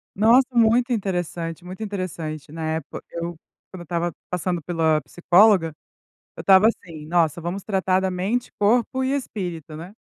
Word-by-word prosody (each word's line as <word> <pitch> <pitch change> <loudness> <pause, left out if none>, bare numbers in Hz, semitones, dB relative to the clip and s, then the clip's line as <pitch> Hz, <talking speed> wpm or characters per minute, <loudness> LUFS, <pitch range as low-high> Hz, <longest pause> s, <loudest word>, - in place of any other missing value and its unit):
Nossa, 235 +6 +5
muito 240 +2 +3
interessante, 175 -4 -3
muito 185 +4 -8
interessante, 160 -7 -5
na 160 -1 -4
época, 160 -2 -5
eu 170 0 -4 0.4
quando 185 - -9
eu - - -6
estava 170 +1 -2 0.2
passando 180 -1 -2
pela 160 -1 +1
psicóloga, 175 +3 +3 0.6
eu - - -7
estava 195 +2 +6
assim, 165 -9 -4
nossa 165 -1 +1
vamos 175 +4 -4
tratar 190 -2 +1
da 190 0 -1
mente, 200 +7 -2
corpo 235 +5 +2
e 260 0 0
espírito, 175 - -5
né? 180 +6 -10
180 Hz, 155 wpm, -23 LUFS, 165-205 Hz, 0.6 s, estava